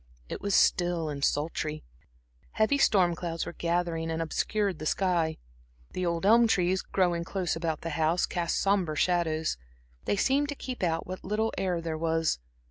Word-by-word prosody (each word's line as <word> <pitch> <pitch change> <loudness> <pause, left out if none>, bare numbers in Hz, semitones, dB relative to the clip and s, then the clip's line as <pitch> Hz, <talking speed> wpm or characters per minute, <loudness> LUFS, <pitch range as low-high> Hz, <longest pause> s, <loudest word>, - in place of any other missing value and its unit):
It - - -5
was 200 -1 0
still 175 -3 +2
and 140 -1 -5
sultry; 155 +1 -1 0.7
heavy 220 +6 +2
storm 185 -8 +4
clouds 165 -1 -4
were - - -6
gathering 170 -1 -1
and 160 0 -2
obscured 190 +3 -1
the 155 - -3
sky. 170 -4 +1 0.5
The 180 - -2
old 170 +2 -1
elm 230 +3 +6
trees, 185 -3 +2
growing 175 -3 0
close 180 0 -2
about 165 -2 -2
the 165 - -4
house, 160 +3 +1
cast 170 -1 -1
sombre 195 -6 +1
shadows; 160 - +1 0.5
they - - +1
seemed 275 +7 +2
to 290 - -3
keep 255 -2 -6
out 165 -2 0
what 185 +1 -7
little 215 +3 -1
air 180 -3 -1
there 160 -1 -4
was. 165 - +1
175 Hz, 170 wpm, -28 LUFS, 165-195 Hz, 0.7 s, elm